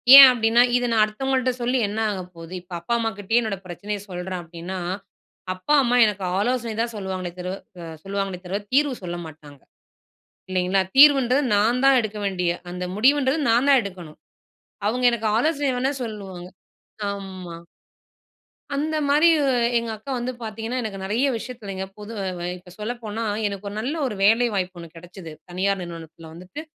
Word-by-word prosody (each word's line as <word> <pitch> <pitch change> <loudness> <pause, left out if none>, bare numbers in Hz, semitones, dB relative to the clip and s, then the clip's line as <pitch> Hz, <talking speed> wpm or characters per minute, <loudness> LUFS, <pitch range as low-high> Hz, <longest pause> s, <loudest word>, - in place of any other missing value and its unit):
ஏன் 275 -1 +13
அப்டின்னா, 230 0 +3 0.2
"இத 245 - -1
நான் 220 -2 +5
அடுத்தவங்கள்ட்ட 255 +3 0
சொல்லி 250 +2 +1
என்ன 210 +2 -4
ஆக 190 -2 -4
போகுது?" 165 +2 -10
இப்ப 180 0 -13
அப்பா 170 +8 -3
அம்மாகிட்டயே 225 0 0
என்னோட 215 -3 -3
பிரச்சனைய 205 +4 -5
சொல்றேன் 180 0 -4
அப்டின்னா, 170 +3 -7 0.7
அப்பா 185 +11 -1
அம்மா 245 0 +2
எனக்கு 200 -3 -2 0.2
ஆலோசனை 235 +1 0
தான் 235 0 -2
சொல்லுவாங்களே 185 -3 -4
தரு 180 +1 -3 0.3
அ - - -7 0.2
சொல்லுவாங்களே 195 -2 -3
தவிர 195 +3 -2
தீர்வு 285 -1 +3
சொல்ல 175 0 -4
மாட்டாங்க. 145 -3 -13 0.9
இல்லைங்களா, 185 +1 +1 0.2
தீர்வுன்றது 275 -2 +7
நான் 230 +5 +2
தான் 270 -1 +6
எடுக்க 215 -1 -5
வேண்டிய, 180 -3 0 0.2
அந்த 180 0 -5
முடிவுன்றது 270 +5 +3
நான் 240 +5 +3
தான் 275 -2 +7
எடுக்கணும். 180 -6 -9 0.7
அவுங்க 245 +4 0
எனக்கு 225 -2 -1
ஆலோசனை 290 0 +1
வேணா 265 +3 0
சொல்லுவாங்க. 190 -5 -7 0.6
ஆமா. 190 -4 -7 1.2
அந்த 310 +2 -1
மாரி 300 +4 +5 0.5
எங்க 230 0 -2
அக்கா 245 +6 -8
வந்து 245 +1 -2
பாத்தீங்கனா, 225 +3 -4
எனக்கு 215 -3 -5
நெறையா 230 +8 +1
விஷயத்துலங்க 215 -5 -6
பொது 210 +1 -9
அ - - -3 0.3
இப்ப 180 0 -16
சொல்லப்போனா, 225 0 -4 0.2
எனக்கு 200 0 -6
ஒரு 200 - -8
நல்ல 260 +7 -2
ஒரு 210 - -4
வேலைவாய்ப்பு 205 -5 +2
ஒண்ணு 170 - -8
கெடச்சிது. 175 0 -10 0.2
தனியார் 190 +2 0
நிறுவனத்துல 165 -1 -9
வந்துட்டு, 185 - -9
210 Hz, 155 wpm, -23 LUFS, 185-245 Hz, 1.2 s, ஏன்